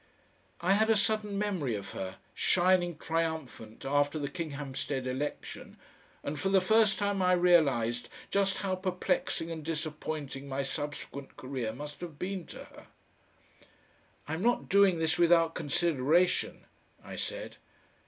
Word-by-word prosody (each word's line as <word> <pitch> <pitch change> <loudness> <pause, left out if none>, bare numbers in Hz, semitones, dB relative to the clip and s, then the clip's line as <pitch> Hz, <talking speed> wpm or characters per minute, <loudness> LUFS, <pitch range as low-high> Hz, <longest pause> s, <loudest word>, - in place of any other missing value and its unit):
I 180 +3 +4
had 220 +2 +3
a 225 - +6
sudden 210 -1 +1
memory 185 - -1
of 100 -1 -6
her, 95 0 -5 0.2
shining 175 -2 +3
triumphant 160 -10 -3
after 145 +2 +2
the 145 -2 -2
Kinghampstead 140 -4 -4
election, 130 +3 -4 0.5
and 145 +1 -3
for 190 - 0
the 195 0 +5
first 215 +1 +4
time 205 -1 0
I 180 0 +4
realised 140 -10 +3 0.2
just 200 -1 +2
how 190 - 0
perplexing 180 -2 -1
and 160 -2 -5
disappointing 150 -3 -4
my 135 +1 -1
subsequent 145 -1 -5
career 130 -5 -3
must 150 +4 -8
have 165 -4 -7
been 185 0 -4
to - - -9
her. - - -15 1.4
"I'm 160 +3 -3
not 240 +3 +1
doing 195 -2 +5
this 160 +2 +1
without 165 -1 +5
consideration," 160 +1 +1 0.4
I - - -8
said. - - -5
165 Hz, 135 wpm, -31 LUFS, 140-185 Hz, 1.4 s, a